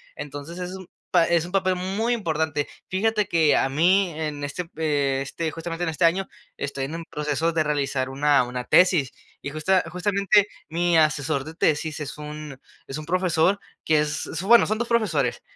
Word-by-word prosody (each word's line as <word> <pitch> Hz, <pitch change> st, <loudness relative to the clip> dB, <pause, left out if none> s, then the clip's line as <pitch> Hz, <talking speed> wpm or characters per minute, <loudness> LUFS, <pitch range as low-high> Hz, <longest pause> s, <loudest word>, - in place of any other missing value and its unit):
Entonces 145 Hz, +4 st, -7 dB
es 180 Hz, 0 st, -5 dB
un 185 Hz, -2 st, -10 dB, 0.2 s
pa 175 Hz, -2 st, +4 dB
es 170 Hz, -1 st, +2 dB
un 180 Hz, -, -10 dB
papel 185 Hz, -1 st, +2 dB
muy 200 Hz, +6 st, -1 dB
importante. 160 Hz, -8 st, -1 dB, 0.2 s
Fíjate 210 Hz, +2 st, +1 dB
que 160 Hz, -4 st, +4 dB
a 135 Hz, -, +2 dB
mí 175 Hz, +6 st, +3 dB
en 150 Hz, -2 st, -4 dB
este, 165 Hz, +4 st, -4 dB
eh, 145 Hz, -4 st, 0 dB
este 160 Hz, +3 st, -3 dB
justamente 165 Hz, +1 st, -5 dB
en 165 Hz, -, 0 dB
este 160 Hz, +2 st, -2 dB
año, 185 Hz, +3 st, +3 dB, 0.3 s
estoy 140 Hz, -1 st, -4 dB
en 150 Hz, +4 st, -6 dB
un 165 Hz, 0 st, -6 dB
proceso 150 Hz, +2 st, -1 dB
de 160 Hz, -, +2 dB
realizar 140 Hz, -3 st, -1 dB
una 140 Hz, 0 st, +3 dB
una 125 Hz, 0 st, -5 dB
tesis 175 Hz, -8 st, +4 dB, 0.3 s
y 145 Hz, -, -5 dB
justa 180 Hz, +5 st, +2 dB
justamente, 200 Hz, +2 st, +2 dB, 0.2 s
mi 170 Hz, +1 st, +1 dB
asesor 150 Hz, -2 st, +1 dB
de 160 Hz, -, -8 dB
tesis 155 Hz, 0 st, 0 dB
es 150 Hz, 0 st, -6 dB
un 150 Hz, -2 st, -8 dB, 0.3 s
es 135 Hz, -, -5 dB
un 155 Hz, -, -7 dB
profesor 180 Hz, +1 st, +2 dB, 0.3 s
que 155 Hz, -1 st, +3 dB
es, 150 Hz, 0 st, -2 dB
bueno, 235 Hz, +5 st, +6 dB
son 215 Hz, +1 st, 0 dB
2 240 Hz, -, -1 dB
profesores. 235 Hz, -2 st, +1 dB
160 Hz, 185 wpm, -24 LUFS, 150-185 Hz, 0.3 s, bueno